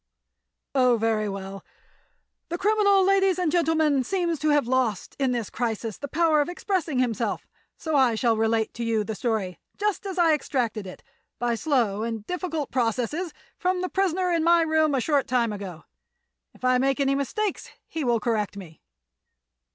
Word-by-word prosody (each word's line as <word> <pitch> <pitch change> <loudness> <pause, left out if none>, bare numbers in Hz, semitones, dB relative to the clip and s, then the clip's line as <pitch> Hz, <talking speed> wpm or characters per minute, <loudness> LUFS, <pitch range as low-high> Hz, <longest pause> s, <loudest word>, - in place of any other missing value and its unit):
"Oh; 250 -3 +4
very 220 -1 0
well. 195 0 -7 0.9
The 345 - -2
criminal, 405 -1 +3
ladies 390 -1 +3
and 355 -4 0
gentlemen, 315 -5 +2
seems 340 +1 -1
to 305 +2 +1
have 290 -4 +3
lost, 245 -6 0
in 265 -2 +2
this 235 -4 -3
crisis, 225 -2 -3
the 285 - -5
power 315 0 +3
of 290 - -2
expressing 350 -5 -2
himself. 235 -3 -1 0.3
So 315 -2 -2
I 260 -5 +4
shall 230 0 +2
relate 225 0 0
to 235 - -5
you 225 -2 +1
the 220 - -4
story, 210 -5 -2 0.2
just 415 0 -1
as 380 -1 -5
I 335 -3 +5
extracted 240 -8 -2
it—by 240 +5 -6
slow 230 -6 0
and 225 -2 -4
difficult 335 -4 -3
processes—from 305 - -2
the 365 - -2
prisoner 370 -1 0
in 335 -2 +1
my 340 0 +5
room, 315 -2 +2
a 260 - +1
short 285 0 +1
time 235 -3 +1
ago. 195 -5 -7 0.7
If - - -7
I 255 0 +4
make 270 +2 +1
any 275 -1 +2
mistakes 375 +9 -2 0.2
he 320 - -4
will 240 -3 +2
correct 215 -3 -1
me." 165 -6 -11
265 Hz, 165 wpm, -25 LUFS, 225-335 Hz, 0.9 s, I